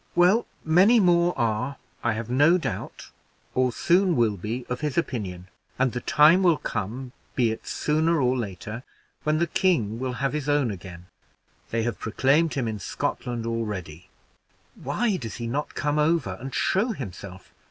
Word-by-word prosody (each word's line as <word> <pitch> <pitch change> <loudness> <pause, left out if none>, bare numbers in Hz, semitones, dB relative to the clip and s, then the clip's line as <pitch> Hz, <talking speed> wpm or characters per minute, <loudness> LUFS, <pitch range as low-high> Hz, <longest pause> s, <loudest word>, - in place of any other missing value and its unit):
"Well, 180 +7 +4 0.2
many 190 +9 +5
more 175 -2 +3
are, 120 +4 -1 0.3
I 120 - +2
have 110 +1 -4
no 145 +8 +4
doubt, 180 - -5 0.4
or 130 -1 +2
soon 180 +7 +2
will 115 -5 +2
be, 115 +6 -4
of 125 +2 -4
his 150 -1 -2
opinion; 95 - -3 0.3
and 130 -1 +2
the 125 - -4
time 155 +6 +5
will 175 -4 +4
come, 120 +5 -4 0.2
be 120 -4 +2
it 110 - -7
sooner 160 +2 +1
or 125 -1 +2
later, 110 0 -5 0.4
when 155 0 +1
the 170 - +2
king 150 - +1
will 130 0 -2
have 135 +3 -1
his 150 -1 -2
own 145 -5 +2
again. 90 -2 -9 0.6
They 115 0 -1
have 120 0 -2
proclaimed 140 +8 +2
him 130 -4 -1
in 110 -2 -3
Scotland 115 +4 -3
already. 95 -7 -4 0.6
Why 195 - -1
does 115 -7 -6
he 120 - -5
not 140 +6 -3
come 150 0 0
over 150 - +1
and 135 +1 -6
show 220 +5 +1
himself? 95 - -9
130 Hz, 165 wpm, -25 LUFS, 110-160 Hz, 0.6 s, many